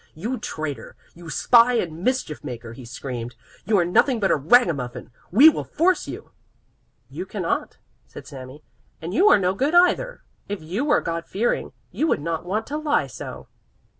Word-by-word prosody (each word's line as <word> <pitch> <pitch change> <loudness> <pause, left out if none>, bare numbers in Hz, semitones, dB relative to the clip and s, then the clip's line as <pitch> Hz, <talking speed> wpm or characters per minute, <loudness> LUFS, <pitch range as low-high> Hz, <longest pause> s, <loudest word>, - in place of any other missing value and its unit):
"You 225 +10 -4
traitor, 155 -8 -6 0.2
you 170 -1 -12
spy 235 +8 +4
and 170 -7 -2
mischief 255 - -1
maker!" 115 -1 -7
he 125 +1 -11
screamed. 120 -1 -6 0.3
"You 210 +1 +2
are 175 - +3
nothing 230 +8 +2
but 195 -2 +1
a - - +4
ragamuffin. 140 - +1 0.2
We 255 - +7
will 320 - +4
force 360 +3 +1
you." - - -8 0.8
"You - - -7
cannot," - - -3 0.3
said - - -11
Sami, 135 +1 -11 0.4
"and 165 +3 -6
you 395 - +5
are - - +7
no 185 -1 +1
good 280 - 0
either! 430 +8 +3 0.3
If 205 -1 -3
you 185 - -3
were 295 - +3
God 170 0 -4
fearing, 225 +5 -1 0.2
you 315 - 0
would - - +1
not 165 +2 -4
want 215 +4 -1
to 295 - -4
lie 300 -1 +1
so." - - -9
185 Hz, 175 wpm, -23 LUFS, 150-255 Hz, 0.8 s, We